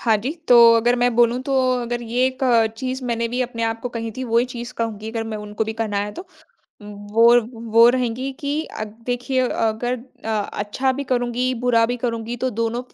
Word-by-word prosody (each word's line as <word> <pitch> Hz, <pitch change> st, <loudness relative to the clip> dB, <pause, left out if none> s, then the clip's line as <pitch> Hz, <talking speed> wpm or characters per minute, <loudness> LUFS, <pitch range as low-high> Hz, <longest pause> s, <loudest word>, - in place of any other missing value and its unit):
हाँ 225 Hz, -2 st, +3 dB
जी। 240 Hz, +7 st, -3 dB, 0.2 s
तो 245 Hz, -, +7 dB, 0.2 s
अगर 240 Hz, +2 st, +2 dB
मैं 245 Hz, -1 st, +1 dB
बोलूँ 240 Hz, +1 st, +3 dB
तो 275 Hz, -, 0 dB, 0.3 s
अगर 240 Hz, 0 st, -3 dB
ये 240 Hz, +2 st, 0 dB
एक 260 Hz, 0 st, -4 dB, 0.4 s
चीज़ 260 Hz, +1 st, -4 dB
मैंने 235 Hz, -1 st, -1 dB
भी 250 Hz, +2 st, -2 dB
अपने 235 Hz, -2 st, -5 dB
आप 225 Hz, 0 st, -1 dB
को 245 Hz, -, -4 dB
कही 230 Hz, -1 st, -5 dB
थी, 260 Hz, -, -4 dB
वही 235 Hz, 0 st, +2 dB
चीज़ 245 Hz, 0 st, -7 dB
कहूँगी 220 Hz, -1 st, -3 dB
अगर 225 Hz, -1 st, -3 dB
मैं 220 Hz, -1 st, -5 dB
उनको 210 Hz, +1 st, -4 dB
भी 220 Hz, -, -4 dB
कहना 220 Hz, -2 st, -3 dB
है 210 Hz, -, -6 dB
तो, 355 Hz, -, -9 dB, 0.6 s
वो 210 Hz, +4 st, +3 dB, 0.3 s
वो 230 Hz, +1 st, +7 dB
रहेंगी 255 Hz, +1 st, -1 dB
कि 290 Hz, +2 st, -1 dB, 0.2 s
अद 215 Hz, -, -3 dB, 0.2 s
देखिए 250 Hz, +1 st, -1 dB
अगर 225 Hz, +2 st, -1 dB, 0.3 s
अ, 225 Hz, -, -3 dB
अच्छा 210 Hz, +4 st, -1 dB
भी 280 Hz, +2 st, -4 dB
करुँगी, 250 Hz, 0 st, -1 dB
बुरा 230 Hz, -1 st, +2 dB
भी 245 Hz, +1 st, -3 dB
करुँगी, 230 Hz, -1 st, -3 dB
तो 255 Hz, +2 st, -1 dB
दोनो 230 Hz, +1 st, -2 dB
फ 250 Hz, -, -20 dB
235 Hz, 210 wpm, -21 LUFS, 225-250 Hz, 0.6 s, तो